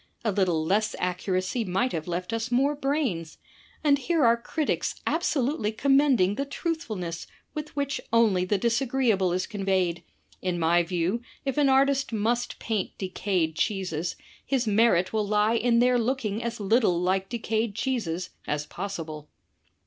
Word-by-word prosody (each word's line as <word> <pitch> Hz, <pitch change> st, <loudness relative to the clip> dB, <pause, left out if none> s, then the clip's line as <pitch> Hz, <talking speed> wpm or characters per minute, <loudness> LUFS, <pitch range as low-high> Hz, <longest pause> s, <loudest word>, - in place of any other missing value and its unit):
A 215 Hz, -, +2 dB
little 180 Hz, -5 st, +1 dB
less 210 Hz, +5 st, +1 dB
accuracy 185 Hz, +5 st, -1 dB
might 210 Hz, +6 st, 0 dB
have 160 Hz, 0 st, -4 dB
left 180 Hz, +4 st, -3 dB
us 225 Hz, +1 st, -2 dB
more 270 Hz, +4 st, +3 dB
brains. 270 Hz, -, -2 dB, 0.5 s
And 285 Hz, -2 st, +4 dB
here 310 Hz, +1 st, +2 dB
are 230 Hz, 0 st, +6 dB
critics 285 Hz, +6 st, -2 dB
abso 320 Hz, -5 st, +1 dB
lutely 245 Hz, -6 st, -1 dB
commending 270 Hz, -5 st, +3 dB
the 275 Hz, -, -2 dB
truthfulness 225 Hz, -, -4 dB, 0.3 s
with 300 Hz, 0 st, -6 dB
which 280 Hz, -1 st, -1 dB
only 220 Hz, -6 st, +4 dB
the 200 Hz, +3 st, +1 dB
disagreeable 230 Hz, -4 st, +1 dB
is 185 Hz, +1 st, 0 dB
conveyed! 190 Hz, -5 st, -1 dB, 0.4 s
In 180 Hz, -1 st, -1 dB
my 170 Hz, +1 st, +3 dB
view, 175 Hz, +5 st, -1 dB, 0.2 s
if 270 Hz, -, -1 dB
an 285 Hz, -2 st, +4 dB
artist 275 Hz, 0 st, +3 dB
must 235 Hz, +3 st, -1 dB
paint 215 Hz, -4 st, -3 dB
decayed 185 Hz, -4 st, -1 dB
cheeses, 180 Hz, -4 st, -1 dB, 0.3 s
his 265 Hz, -3 st, 0 dB
merit 205 Hz, -4 st, +3 dB
will 215 Hz, -2 st, 0 dB
lie 210 Hz, +2 st, +2 dB
in 235 Hz, 0 st, +2 dB
their 245 Hz, +1 st, +4 dB
looking 230 Hz, -3 st, -1 dB
as 235 Hz, -1 st, -4 dB
little 205 Hz, -3 st, +2 dB
like 190 Hz, +2 st, 0 dB
decayed 225 Hz, -2 st, -1 dB
cheeses 210 Hz, -8 st, -2 dB, 0.2 s
as 150 Hz, 0 st, -1 dB
possible!" 160 Hz, -5 st, -6 dB
215 Hz, 150 wpm, -26 LUFS, 185-250 Hz, 0.5 s, are